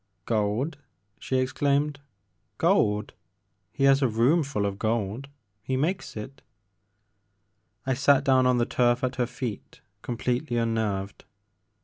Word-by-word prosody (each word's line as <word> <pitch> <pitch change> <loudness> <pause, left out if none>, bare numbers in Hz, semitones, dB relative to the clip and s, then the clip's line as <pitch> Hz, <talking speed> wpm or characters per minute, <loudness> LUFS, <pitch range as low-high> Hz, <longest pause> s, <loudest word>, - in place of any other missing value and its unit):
Gold! 115 +7 -1 0.2
" 100 +3 -44
she 130 - -1
exclaimed, 140 +3 0 0.3
*' - - -47
gold! 105 0 +1 0.6
He 135 - -3
has 135 0 +5
a 135 - +4
room 120 +9 +3
fiiU 135 -8 -2
of 100 0 -3
gold! 110 +3 -1 0.3
He 130 +5 -2
makes 165 - -2
it. 130 +5 -8 0.5
' 100 0 -47
' 105 0 -47
I 130 - +1
sat 135 +1 +4
down 130 -2 +4
on 125 -1 +3
the 120 - +2
turf 120 +1 +1
at 125 0 -1
her 125 -1 +1
feet 120 -4 -6 0.2
completely 125 +1 -2
unnerved. 110 -4 -2
120 Hz, 145 wpm, -26 LUFS, 105-135 Hz, 0.6 s, has